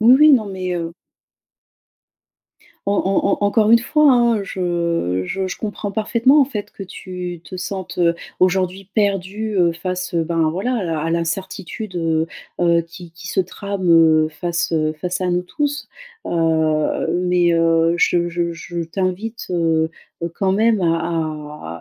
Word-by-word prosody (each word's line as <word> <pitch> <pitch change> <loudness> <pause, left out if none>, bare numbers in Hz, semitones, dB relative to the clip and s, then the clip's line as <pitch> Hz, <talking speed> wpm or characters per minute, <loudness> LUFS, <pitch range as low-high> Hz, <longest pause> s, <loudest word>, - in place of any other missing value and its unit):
Oui 235 +3 +7
oui 305 0 +7
non 230 -6 +4
mais 185 -2 -4
heu 170 -1 -3 1.9
En 200 - +2
en 195 -1 +1 0.2
en 205 - +3
encore 215 +1 +3
une 230 - +8
fois, 300 +5 +3
hein, 235 -3 +3
je 170 - -1
je 190 - -2
je 185 - -5
comprends 205 -1 -4
parfaitement 235 +7 +3
en - - +6
fait 210 -6 -6
que - - -8
tu 180 -2 -7
te - - -10
sentes, 185 -1 -5
heu, 170 -1 +3 0.2
aujourd'hui 185 +1 +1
perdu, 205 +1 -1
heu, 175 -2 +4
face, 180 +2 -4
heu, 165 -1 +1
ben, 165 -1 +1
voilà 200 +10 -1
à - - -2
la 165 -3 -2
à 160 - -2
l'incertitude, 185 +4 -3
heu 165 -2 0 0.3
heu, 170 -1 +3
qui 170 0 -12
qui 175 +1 -10
se - - -3
trame, 190 +1 -2
heu, 160 -2 +5
face, 170 +2 -2
heu, 155 -1 +1
face 180 +1 -2
à 180 -1 0
nous 175 0 +1
tous. 290 - -3 0.4
Heu, 160 -2 +1 0.2
mais, 180 -1 +3
heu, 165 0 +3
je 175 0 +2
je 170 0 -1
je 170 +1 -5
t'invite, 190 +6 -3
heu 165 -2 +1 0.3
heu, 170 - -2
quand 190 0 0
même 215 +2 +3
à 155 - -2
180 Hz, 165 wpm, -20 LUFS, 165-200 Hz, 1.9 s, une